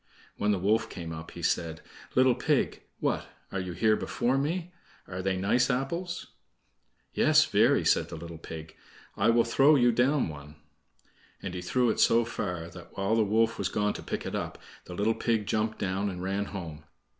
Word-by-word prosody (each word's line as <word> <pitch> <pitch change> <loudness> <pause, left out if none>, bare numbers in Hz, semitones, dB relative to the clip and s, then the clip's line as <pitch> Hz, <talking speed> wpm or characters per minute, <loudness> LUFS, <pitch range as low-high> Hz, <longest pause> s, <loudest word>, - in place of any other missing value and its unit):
When 105 - 0
the 105 - +3
wolf 105 +5 +1
came 85 -2 -6
up 80 0 -7
he - - -9
said: 80 -1 0 0.3
"Little 130 0 +5
pig, - - 0 0.2
what! - - -1 0.2
are 95 - -2
you 90 -1 -4
here 110 +4 +3
before 125 +4 0
me? 165 +6 -1 0.3
Are 90 0 -5
they 95 0 0
nice 100 +8 +2
apples?" 170 +8 -2 0.9
"Yes, - - +5
very," - - +3
said - - +3
the - - -6
little 85 0 -8
pig. 80 -1 -9 0.4
"I - - +2
will 115 0 +5
throw 135 +5 +5
you 120 -3 +5
down 130 +3 +2
one." 75 -1 -9 0.9
And 95 - -4
he 90 - -4
threw 120 +6 +2
it - - -3
so 115 0 +5
far 90 -7 -4
that, 85 0 -13
while 100 +2 +1
the 115 - +4
wolf 110 +2 +2
was 95 - 0
gone 105 0 0
to - - -7
pick - - -4
it - - -4
up, - - -3 0.3
the 90 - -8
little 105 +4 +2
pig 115 -2 0
jumped 110 +1 0
down 95 +1 -1
and 90 -1 -6
ran 100 +2 -1
home. 80 -7 -7
105 Hz, 190 wpm, -29 LUFS, 90-120 Hz, 0.9 s, Little